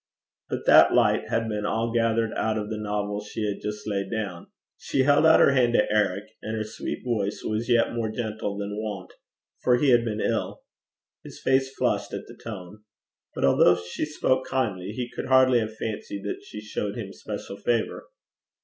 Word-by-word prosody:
But -, -, -4 dB
that -, -, +7 dB
light -, -, +3 dB
had 115 Hz, 0 st, 0 dB
been 105 Hz, -1 st, -2 dB
all 115 Hz, +2 st, -1 dB
gathered 115 Hz, -1 st, +1 dB
out 110 Hz, 0 st, 0 dB
of 105 Hz, 0 st, -4 dB
the 110 Hz, -, -3 dB
novel 105 Hz, -1 st, -2 dB
she 105 Hz, +1 st, -4 dB
had 100 Hz, -1 st, -3 dB
just 105 Hz, 0 st, -5 dB
laid 100 Hz, -2 st, -2 dB
down. 100 Hz, -6 st, -4 dB, 0.3 s
She 135 Hz, -, 0 dB
held 145 Hz, +3 st, +5 dB
out 160 Hz, -, +7 dB
her -, -, +6 dB
hand 125 Hz, -3 st, +3 dB
to 105 Hz, -, +4 dB
Eric, 105 Hz, -2 st, +1 dB, 0.2 s
and 110 Hz, 0 st, -4 dB
her 110 Hz, -, -1 dB
sweet 110 Hz, +1 st, -6 dB
voice 105 Hz, -4 st, -1 dB
was 110 Hz, +3 st, -2 dB
yet 120 Hz, -1 st, +3 dB
more 115 Hz, -2 st, -1 dB
gentle 110 Hz, -2 st, -3 dB
than 100 Hz, +1 st, -4 dB
wont, 100 Hz, -4 st, -6 dB, 0.5 s
for 125 Hz, -, +4 dB
he 135 Hz, +3 st, +2 dB
had 120 Hz, -2 st, +5 dB
been 110 Hz, -2 st, -3 dB
ill. -, -, -2 dB, 0.6 s
His -, -, -11 dB
face 135 Hz, 0 st, +2 dB
flushed -, -, 0 dB
at -, -, -6 dB
the -, -, -12 dB
tone. 105 Hz, -2 st, -9 dB, 0.5 s
But -, -, +1 dB
although 90 Hz, -, +5 dB
she 90 Hz, +10 st, -4 dB
spoke 130 Hz, -3 st, 0 dB
kindly, 105 Hz, -9 st, -1 dB
he 120 Hz, +3 st, -4 dB
could -, -, -6 dB
hardly 130 Hz, -1 st, +5 dB
have 110 Hz, -1 st, -4 dB
fancied 105 Hz, -2 st, -5 dB
that 100 Hz, -, -4 dB
she 105 Hz, -, -9 dB
showed 105 Hz, -1 st, -4 dB
him -, -, -6 dB
special 100 Hz, -, -7 dB
favour. 115 Hz, +2 st, -1 dB
110 Hz, 195 wpm, -26 LUFS, 105-120 Hz, 0.6 s, that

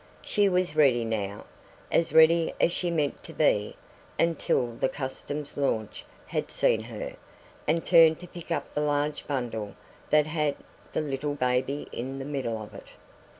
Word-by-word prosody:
She 205 Hz, -1 st, +2 dB
was 180 Hz, -4 st, 0 dB
ready 130 Hz, -6 st, +4 dB
now 105 Hz, -2 st, -3 dB, 0.5 s
as 165 Hz, -, +2 dB
ready 160 Hz, +1 st, +5 dB
as -, -, +4 dB
she 175 Hz, 0 st, -1 dB
meant 150 Hz, -4 st, -1 dB
to 165 Hz, -, -10 dB
be 105 Hz, -9 st, +2 dB, 0.4 s
until 160 Hz, -7 st, +1 dB
the 115 Hz, -, 0 dB
Customs 145 Hz, +2 st, -5 dB
launch 110 Hz, -7 st, -1 dB, 0.2 s
had -, -, -3 dB
seen -, -, +2 dB
her -, -, -6 dB, 0.5 s
and 165 Hz, +2 st, +1 dB
turned 165 Hz, -2 st, +6 dB
to 180 Hz, -, -9 dB
pick 175 Hz, -1 st, -11 dB
up 170 Hz, -, -2 dB
the 150 Hz, -, 0 dB
large 145 Hz, 0 st, -1 dB
bundle 115 Hz, -7 st, -3 dB, 0.3 s
that 150 Hz, -1 st, +5 dB
had 150 Hz, -2 st, 0 dB, 0.4 s
the -, -, 0 dB
little 145 Hz, 0 st, -2 dB
baby 125 Hz, +2 st, 0 dB
in 130 Hz, +3 st, -5 dB
the 135 Hz, -, -5 dB
middle 135 Hz, -6 st, -2 dB
of 105 Hz, -, -9 dB
it. -, -, -11 dB
145 Hz, 160 wpm, -27 LUFS, 125-160 Hz, 0.5 s, turned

